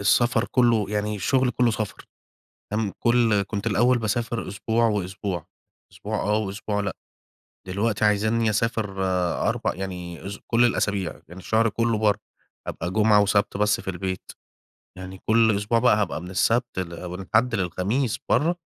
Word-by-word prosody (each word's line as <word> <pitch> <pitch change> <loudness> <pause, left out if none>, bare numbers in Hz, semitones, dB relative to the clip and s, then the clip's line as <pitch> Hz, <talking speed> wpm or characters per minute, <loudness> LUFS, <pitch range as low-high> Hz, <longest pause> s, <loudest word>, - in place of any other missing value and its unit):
السَفر 120 +3 +3
كلّه 120 -5 +3
يعني 105 0 -1
الشُغل 130 +6 +2
كلّه 120 0 +2
سَفر 105 -3 -4 0.7
تم 105 -2 -1
كل 115 -4 +3
كنت 100 +2 -5
الأول 120 +4 +3
باسافر 115 0 -2
أسبوع 110 +4 0
وأسبوع 95 -4 -3 0.5
أسبوع - - -4
آه، 105 +1 +1
وأسبوع 105 0 -3
لأ. 100 - -3 0.7
دلوقتي 105 +3 0
عايزينّي 110 +2 +2
أسافر 105 -2 -1 0.5
أربع - - -1
يعني 90 -2 -6
أس 100 - -6
كل 120 +1 +4
الأسابيع 100 -6 0 0.2
يعني 90 +3 -11
الشهر 110 +4 +2
كلّه 115 +1 0
برّا، 105 -1 +2 0.5
أبقى 85 +2 -4
جمعة 105 0 +4
وسَبت 100 0 +1
بس 105 +1 +2
في - - -6
البيت 95 0 -4 0.7
يعني 95 +1 -8
كل 110 -1 +4
أسبوع 105 +3 +1
بقى 120 -2 +4
هابقى 105 -7 -1
من 90 - -8
السَبت 115 +3 +1
ل 90 0 -5
من 90 +2 -6
الحد 110 +6 +1
للخميس 100 - -1
برّا، 165 +4 +3
105 Hz, 150 wpm, -24 LUFS, 95-115 Hz, 0.7 s, كل